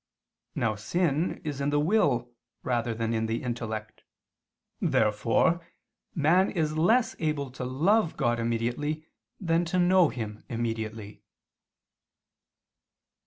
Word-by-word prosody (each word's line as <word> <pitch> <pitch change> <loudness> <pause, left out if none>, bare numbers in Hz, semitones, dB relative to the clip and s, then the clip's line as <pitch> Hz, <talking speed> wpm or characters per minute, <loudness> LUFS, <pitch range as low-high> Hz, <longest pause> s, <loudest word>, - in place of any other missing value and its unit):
Now 110 - +1
sin 155 - 0
is 145 -3 -4
in 140 - +1
the 145 0 +2
will 145 - +2 0.3
rather 120 -2 -1
than 115 0 -1
in 110 0 0
the 115 +1 -2
intellect. 110 -3 -5 0.8
Therefore 110 +10 +2 0.5
man 175 +5 +4
is 155 -4 -1
less 225 +9 +3
able 150 -4 -1
to 130 - -6
love 165 - +2
God 120 -4 +1
immediately 120 +7 -2 0.3
than 170 -2 +1
to 185 +2 -1
know 180 -2 +5
Him 110 -3 -6
immediately. 110 -3 -4
130 Hz, 115 wpm, -28 LUFS, 115-165 Hz, 0.8 s, know